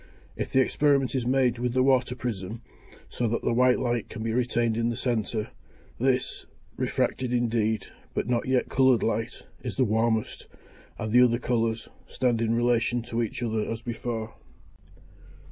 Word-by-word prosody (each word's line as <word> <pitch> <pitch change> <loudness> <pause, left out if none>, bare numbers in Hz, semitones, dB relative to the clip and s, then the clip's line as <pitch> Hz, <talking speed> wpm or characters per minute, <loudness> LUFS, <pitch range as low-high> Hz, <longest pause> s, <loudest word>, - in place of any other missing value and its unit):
If - - -4
the 130 - +4
experiment 140 -1 +2
is 125 -3 -1
made 125 -2 +2
with 125 0 -1
the 130 - +4
water 130 -2 +2
prism, 115 -2 -5 0.4
so 120 - -2
that 115 +1 -1
the - - +1
white 125 +1 +4
light 120 -3 -1
can 110 0 -6
be 115 0 -1
retained 120 -2 +1
in 115 +1 +1
the 120 - -2
centre, 110 -3 -1 0.5
this, 130 +1 0 0.3
refracted 130 -1 -1
indeed, 115 -3 +1 0.3
but - - -1
not 120 0 0
yet 130 -1 +2
coloured 130 -3 +3
light, 115 +1 -2 0.2
is 125 - -5
the 130 - +3
warmest; 110 0 0 0.5
the 110 +3 +4
other 120 -1 +3
colours, 115 -2 -1 0.2
stand 120 -3 0
in 115 0 +1
relation 120 0 +1
to 120 0 -2
each 115 +1 -3
other 110 -2 -1
as 115 0 -4
before. 115 -1 -4
120 Hz, 160 wpm, -27 LUFS, 115-125 Hz, 0.5 s, the